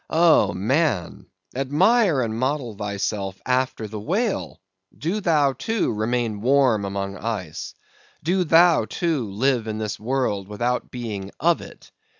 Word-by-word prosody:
Oh, 160 - +4
man! 110 - 0 0.3
admire 165 - +3
and 110 -2 -2
model 130 -2 -2
thyself 100 -1 -3
after 130 -3 0
the 105 0 -6
whale! 195 - -2 0.4
Do 180 +8 -2
thou, 150 -7 +3
too, 200 - -1
remain 110 -1 -1
warm 125 -4 +3
among 100 0 -4
ice. 100 -8 -5 0.5
Do 180 +4 +2
thou, 170 0 +5
too, 155 - -1
live 120 +3 0
in 110 -1 -3
this 105 -2 -4
world 110 -5 -1
without 120 +4 -2
being 105 -6 -5
of - - +2
it. - - -13
125 Hz, 135 wpm, -23 LUFS, 105-150 Hz, 0.5 s, thou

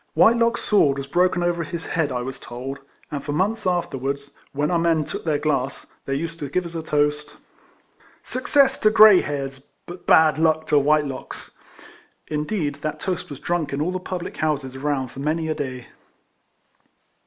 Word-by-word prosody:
Whitelock's 235 +1 +4
sword 145 -10 +3
was 140 - -4
broken 175 +4 +1
over 175 -1 0
his 165 +1 -5
head 160 -4 -1
I 125 -1 -2
was 130 +1 -6
told; 130 +3 -7 0.3
and 140 -2 -4
for 145 - -3
months 195 +6 0
afterwards, 140 -5 -2 0.2
when 145 +2 -1
our 170 - +2
men 165 -2 +2
took - - -6
their 155 -3 +1
glass, 140 -3 -1 0.2
they 135 - -1
used 165 +3 -4
to 145 - -5
give 180 +5 -1
as 170 0 -8
a 165 - -2
toast 150 -1 -1 0.4
" - - -31
Success 275 +2 +3
to 215 - +4
grey 215 -3 +8
hairs 135 -2 -4
^ 135 - -25 0.2
but 175 +1 -11
bad 155 -2 +5
luck 160 -1 +2
to 150 - +4
White 150 +1 +3
locks.'" 135 -2 -8 0.7
Indeed 150 0 -2
that 155 -1 -3
toast 185 -3 -3
was 140 -2 -8
drunk 170 -3 -2
in 140 - -2
all 160 +5 0
the 185 - -3
public 180 -1 -6
houses 140 -4 -1
around 135 -1 -2
for 135 - -11
many 160 +3 -1
a - - +1
day. 130 -5 -6
155 Hz, 190 wpm, -23 LUFS, 140-175 Hz, 0.7 s, grey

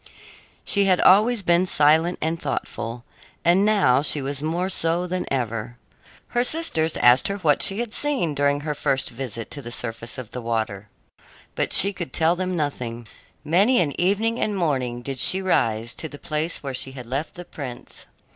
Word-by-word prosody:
She 200 -1 +2
had 185 -2 +3
always 215 +3 +4
been 175 +1 +3
silent 160 +3 +3
and 165 +1 -2
thoughtful, 120 +1 -4 0.4
and 175 +3 +4
now 200 -12 +3
she 150 0 +4
was 140 0 -4
more 170 +4 -1
so 170 -1 0
than 180 0 -4
ever. 120 -2 -3 0.5
Her 240 0 +1
sisters 250 - +1
asked 120 +2 +5
her 200 - -2
what 150 -7 +2
she 195 +4 +2
had 235 -2 -5
seen 270 - 0
during 145 0 +1
her 150 0 -3
first 135 -2 -1
visit 115 -2 -6
to 145 - -5
the 120 -2 -8
surface 115 -1 -3
of 125 -3 -8
the 125 - -6
water, 110 -3 -3 0.6
but - - -2
she 200 +2 +4
could 175 -3 -6
tell 165 +2 +2
them 185 0 -2
nothing. 125 -7 -4 0.4
Many 200 - +3
an 150 -5 0
evening 215 +6 +1
and 210 -2 -1
morning 130 -8 -1
did 135 -1 -5
she 185 - +3
rise 115 - 0
to 160 - -5
the 145 - -10
place 155 +1 -3
where 135 -1 -4
she 130 +1 -1
had 125 -2 -9
left 135 +6 -4
the 175 0 -9
prince. 130 -7 -9
155 Hz, 185 wpm, -23 LUFS, 125-185 Hz, 0.6 s, asked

